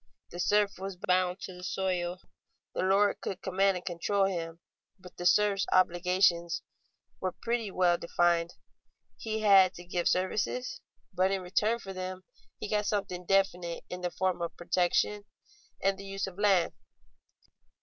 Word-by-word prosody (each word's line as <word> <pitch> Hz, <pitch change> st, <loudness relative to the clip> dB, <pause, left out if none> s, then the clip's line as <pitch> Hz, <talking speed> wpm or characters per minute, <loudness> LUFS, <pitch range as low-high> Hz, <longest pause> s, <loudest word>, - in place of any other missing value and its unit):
The 175 Hz, -, -8 dB
serf 205 Hz, +1 st, +2 dB
was 195 Hz, 0 st, -5 dB
bound 180 Hz, 0 st, 0 dB
to 185 Hz, -, -6 dB
the 180 Hz, 0 st, -11 dB
soil; 180 Hz, -1 st, -2 dB, 0.5 s
the -, -, -2 dB
lord 195 Hz, +2 st, +2 dB
could 195 Hz, -1 st, -5 dB
command 190 Hz, 0 st, +2 dB
and 180 Hz, -, -9 dB
control 195 Hz, +3 st, 0 dB
him; 165 Hz, -3 st, -3 dB, 0.4 s
but 180 Hz, -2 st, -14 dB
the 175 Hz, -, +1 dB
serf's 200 Hz, -2 st, +3 dB
obligations 175 Hz, -1 st, +2 dB, 0.6 s
were 185 Hz, -1 st, -3 dB
pretty 230 Hz, -2 st, -1 dB
well 180 Hz, -2 st, +2 dB
defined. 170 Hz, 0 st, +1 dB, 0.6 s
He 220 Hz, -1 st, -3 dB
had 195 Hz, -3 st, +6 dB
to 175 Hz, -, -9 dB
give 175 Hz, 0 st, -2 dB
services, 190 Hz, +3 st, -1 dB, 0.3 s
but 185 Hz, +1 st, +2 dB
in 195 Hz, -1 st, -1 dB
return 210 Hz, +5 st, +1 dB
for 195 Hz, -5 st, -8 dB
them 185 Hz, 0 st, -6 dB, 0.4 s
he -, -, -4 dB
got 210 Hz, 0 st, 0 dB
something 180 Hz, -4 st, -2 dB
definite 180 Hz, -3 st, +1 dB
in 180 Hz, 0 st, -5 dB
the 180 Hz, -, -1 dB
form 180 Hz, +1 st, -1 dB
of 170 Hz, -1 st, -4 dB
protection 180 Hz, +4 st, +1 dB, 0.6 s
and 195 Hz, 0 st, +1 dB
the 200 Hz, -, -8 dB
use 195 Hz, 0 st, -3 dB
of 190 Hz, 0 st, -9 dB
land. 195 Hz, -4 st, +3 dB
185 Hz, 155 wpm, -30 LUFS, 175-195 Hz, 0.6 s, had